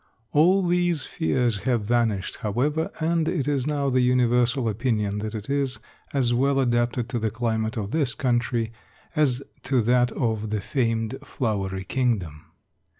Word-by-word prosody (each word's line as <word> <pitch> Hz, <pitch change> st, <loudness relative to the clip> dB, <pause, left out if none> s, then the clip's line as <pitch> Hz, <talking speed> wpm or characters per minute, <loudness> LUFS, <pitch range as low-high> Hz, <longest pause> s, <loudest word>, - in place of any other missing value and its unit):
All 180 Hz, +6 st, +4 dB
these 175 Hz, -3 st, +1 dB
fears 125 Hz, -, 0 dB
have 120 Hz, -3 st, 0 dB
vanished, 110 Hz, -4 st, 0 dB
however, 140 Hz, +10 st, 0 dB
and 165 Hz, 0 st, +1 dB
it 155 Hz, -7 st, -1 dB
is 140 Hz, -2 st, 0 dB
now 140 Hz, -2 st, 0 dB
the 130 Hz, 0 st, +3 dB
universal 125 Hz, 0 st, +2 dB
opinion 105 Hz, -2 st, 0 dB
that 110 Hz, +1 st, -4 dB
it 105 Hz, -1 st, -6 dB
is 140 Hz, -3 st, 0 dB, 0.3 s
as 125 Hz, -4 st, +1 dB
well 135 Hz, +3 st, +2 dB
adapted 120 Hz, -1 st, +1 dB
to 120 Hz, -2 st, -1 dB
the 110 Hz, 0 st, 0 dB
climate 110 Hz, +1 st, -1 dB
of 105 Hz, -1 st, -3 dB
this 145 Hz, -6 st, 0 dB
country 120 Hz, -3 st, 0 dB, 0.4 s
as 140 Hz, -4 st, +2 dB, 0.2 s
to 130 Hz, -1 st, +1 dB
that 120 Hz, +1 st, +3 dB
of 110 Hz, -3 st, -1 dB
the 105 Hz, 0 st, -1 dB
famed 115 Hz, +1 st, -1 dB
Flowery 100 Hz, -8 st, -2 dB
Kingdom. 95 Hz, -, -1 dB
120 Hz, 150 wpm, -25 LUFS, 110-135 Hz, 0.4 s, All